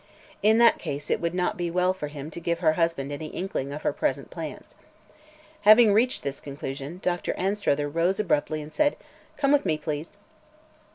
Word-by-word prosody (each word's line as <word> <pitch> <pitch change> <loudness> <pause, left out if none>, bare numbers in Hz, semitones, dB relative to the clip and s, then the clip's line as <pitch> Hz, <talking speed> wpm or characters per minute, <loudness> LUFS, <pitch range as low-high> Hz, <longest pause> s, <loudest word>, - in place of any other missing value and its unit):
In 220 +2 +5
that 235 -1 +5
case 145 +1 -5
it - - +1
would 170 +1 -1
not 180 -1 0
be 175 -1 -2
well 180 +2 +2
for 170 -6 -5
him 145 +1 -8
to 170 - -6
give 170 0 -1
her 160 -2 +3
husband 165 -4 0
any 145 +2 -5
inkling 165 -6 -4
of 150 +2 -6
her - - +1
present - - -2
plans. - - -7 0.9
Having 215 +1 +7
reached 245 +5 +2
this 140 -1 -4
conclusion, 140 +3 -6
Dr. 175 -1 -1
Anstruther 190 -7 0
rose 170 +6 0
abruptly 155 -5 0
and 150 - -11
said: 295 -1 +2 0.4
"Come 275 -1 +2
with 290 -1 +4
me, 160 -5 0
please." 155 +2 -5
170 Hz, 185 wpm, -26 LUFS, 150-195 Hz, 0.9 s, Having